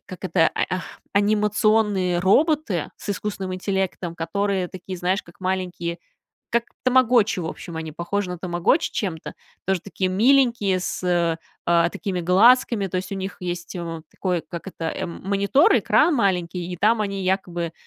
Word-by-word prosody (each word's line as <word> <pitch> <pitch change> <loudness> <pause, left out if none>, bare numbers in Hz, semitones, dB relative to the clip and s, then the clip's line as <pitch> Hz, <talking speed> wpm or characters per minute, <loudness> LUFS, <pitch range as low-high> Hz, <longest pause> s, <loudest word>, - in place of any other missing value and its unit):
как 185 0 -10
это, 165 -2 +3
ай, - - 0
ах, 185 0 -5
анимационные 210 -2 +2
роботы 250 - +2
с - - -10
искусственным 195 -2 -3
интеллектом, 185 -2 -2
которые 190 +2 -1
такие, 185 +1 -7
знаешь, 185 +3 0
как 170 - -19
маленькие 180 -2 -2 0.5
как 235 0 +1 0.2
тамагочи, 245 -5 +4
в 165 - -4
общем, 165 +1 -7
они 160 -1 -5
похожи 180 +5 -3
на 180 - -4
тамагочи 175 - +1
чем-то. 170 -6 -3 0.3
Тоже 190 -2 0
такие 190 -1 -2
миленькие, 235 -2 +3
с, 180 - -4
э, 175 -2 +2 0.3
а 170 0 +3
такими 180 0 -3
глазками, 205 +3 +4
то 185 - -5
есть, 185 +2 -3
у - - -2
них 190 +1 -5
есть, 175 0 -5
э, 165 -2 -5
такой, 180 -3 -2
как 170 -1 -6
это, 165 -3 -6
эм, 170 +1 -5
монитор, 200 - +4
экран 340 - +3
маленький, 180 -5 0
и 180 - -5
там 215 +4 +3
они 200 -2 -2
якобы, 175 -3 -1
185 Hz, 160 wpm, -23 LUFS, 175-205 Hz, 0.5 s, тамагочи